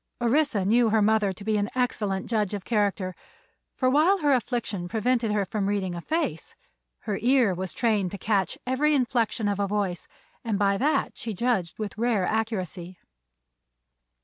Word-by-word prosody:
Orissa 240 Hz, -4 st, +2 dB
knew 230 Hz, +3 st, +4 dB
her 220 Hz, 0 st, +3 dB
mother 215 Hz, -2 st, +3 dB
to 190 Hz, +2 st, -10 dB
be 215 Hz, 0 st, +1 dB
an 205 Hz, +1 st, -1 dB
excellent 210 Hz, -6 st, -1 dB
judge 210 Hz, -3 st, -1 dB
of 200 Hz, -, -7 dB
character, 200 Hz, -4 st, 0 dB, 0.6 s
for 255 Hz, -, +1 dB
while 310 Hz, +9 st, +4 dB
her 295 Hz, -6 st, +2 dB
affliction 235 Hz, -7 st, -2 dB
prevented 230 Hz, +2 st, 0 dB
her 205 Hz, -1 st, +1 dB
from 200 Hz, 0 st, -2 dB
reading 195 Hz, -3 st, -1 dB
a 170 Hz, -, -5 dB
face 325 Hz, -, -3 dB, 0.5 s
her 210 Hz, -3 st, -3 dB
ear 245 Hz, -4 st, +3 dB
was 185 Hz, +1 st, -4 dB
trained 215 Hz, -6 st, +1 dB
to 200 Hz, -, -7 dB
catch 200 Hz, -1 st, 0 dB
every 290 Hz, +4 st, +2 dB
inflection 235 Hz, -4 st, 0 dB
of 205 Hz, -1 st, -1 dB
a 200 Hz, -, +1 dB
voice, 195 Hz, -4 st, -2 dB, 0.4 s
and 225 Hz, -4 st, -1 dB
by 200 Hz, -1 st, +2 dB
that 290 Hz, +9 st, 0 dB
she 225 Hz, -4 st, -5 dB
judged 205 Hz, -6 st, 0 dB
with 215 Hz, 0 st, -5 dB
rare 230 Hz, -5 st, +1 dB
accuracy. 185 Hz, -5 st, -3 dB
215 Hz, 170 wpm, -26 LUFS, 195-245 Hz, 0.6 s, knew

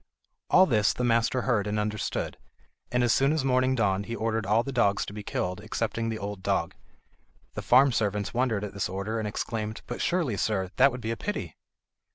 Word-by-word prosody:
All 185 Hz, -, +7 dB
this 105 Hz, -, +2 dB
the 125 Hz, -, -3 dB
master 115 Hz, +1 st, +2 dB
heard 110 Hz, -5 st, +1 dB
and 105 Hz, +1 st, -1 dB
understood, 105 Hz, 0 st, -2 dB, 0.6 s
and 125 Hz, 0 st, +2 dB
as 120 Hz, -, +3 dB
soon 135 Hz, +2 st, +3 dB
as 155 Hz, -3 st, 0 dB
morning 130 Hz, 0 st, +2 dB
dawned 100 Hz, -4 st, 0 dB
he 115 Hz, -, -3 dB
ordered 110 Hz, -2 st, -1 dB
all 110 Hz, +3 st, +3 dB
the 135 Hz, -, -5 dB
dogs 100 Hz, -6 st, +2 dB
to -, -, -8 dB
be 105 Hz, -, -6 dB
killed 90 Hz, -1 st, -3 dB
excepting 115 Hz, +1 st, -2 dB
the 110 Hz, -, -3 dB
old 100 Hz, -1 st, -5 dB
dog. -, -, 0 dB, 0.8 s
The -, -, -4 dB
farm 135 Hz, +1 st, +5 dB
servants 105 Hz, -3 st, -1 dB
wondered 120 Hz, -4 st, 0 dB
at 105 Hz, -, -5 dB
this 100 Hz, -3 st, -2 dB
order, 100 Hz, +4 st, -3 dB
and 110 Hz, -, -2 dB
exclaimed: 110 Hz, +1 st, -4 dB
"But 120 Hz, -, -5 dB
surely, 165 Hz, -, 0 dB
sir, 95 Hz, -2 st, -1 dB
that 135 Hz, +2 st, +6 dB
would 125 Hz, 0 st, -7 dB
be 115 Hz, -, -3 dB
a 115 Hz, -, -3 dB
pity?" 205 Hz, -, -4 dB
110 Hz, 205 wpm, -27 LUFS, 105-125 Hz, 0.8 s, All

